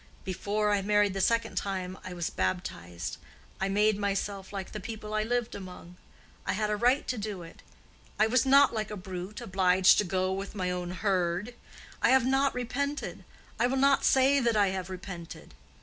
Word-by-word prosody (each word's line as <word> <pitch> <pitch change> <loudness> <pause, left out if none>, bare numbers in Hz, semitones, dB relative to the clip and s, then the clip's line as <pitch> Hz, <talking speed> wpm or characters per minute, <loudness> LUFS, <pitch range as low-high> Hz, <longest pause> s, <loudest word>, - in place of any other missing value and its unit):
Before 205 +3 -1
I 205 -1 +2
married 205 0 +2
the 195 - -2
second 230 +3 +1
time 185 -2 -2
I 185 - -7
was 175 -2 -3
baptized; 90 -1 -3 0.4
I 195 - 0
made 210 +1 +2
myself 200 -1 -2
like 195 -2 -5
the 210 - -5
people 215 0 -7
I 215 - +1
lived 240 +1 -1
among. 180 -2 -9 0.5
I - - -1
had 210 0 -1
a - - +2
right 245 +6 +2
to 250 - -2
do 205 -4 -5
it; 165 - -13 0.6
I 215 - +5
was 235 +2 +3
not 275 -1 +6
like 215 -2 -2
a 210 - -5
brute, 185 +3 -7
obliged 190 -3 +4
to - - +3
go 185 0 0
with 195 +2 -5
my 185 -2 -1
own 180 -1 -3
herd. 185 +3 -1 0.5
I - - +4
have 260 -2 +5
not 270 +1 +2
repented; 280 +4 -3 0.4
I 240 - +4
will 265 +2 -1
not 275 +1 +4
say 270 +1 +4
that 235 -4 +2
I 200 -2 +4
have 185 -1 -4
repented. 180 -2 -8
200 Hz, 190 wpm, -29 LUFS, 185-230 Hz, 0.6 s, not